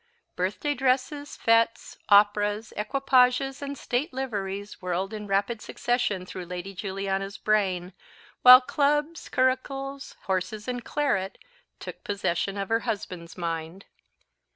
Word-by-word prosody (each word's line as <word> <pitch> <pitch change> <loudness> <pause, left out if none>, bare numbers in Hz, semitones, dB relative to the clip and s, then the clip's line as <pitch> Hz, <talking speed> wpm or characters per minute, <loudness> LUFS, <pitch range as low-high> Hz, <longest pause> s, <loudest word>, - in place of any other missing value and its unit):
Birthday 200 +11 -1
dresses, 270 +2 0
fetes, 230 0 +2
operas, 205 +1 +3
equipages, 260 +3 +2
and 280 0 -5
state 260 +9 -2
liveries 205 -6 -4
whirled 185 +2 -2
in 210 -1 -6
rapid 200 +3 0
succession 210 -6 -1
through 185 0 -7
Lady 180 +2 -6
Juliana's 195 +1 -3
brain, 190 -4 0 0.5
while 255 +1 +11
clubs, 295 +4 0
curricles, 270 +1 -1
horses, 190 +3 -2
and 245 -1 -3
claret, 200 -10 -1 0.4
took - - -9
possession 200 -1 -1
of 195 -1 -3
her 225 0 +2
husband's 190 -7 -5
mind. 165 +2 -4
210 Hz, 115 wpm, -26 LUFS, 195-255 Hz, 0.5 s, while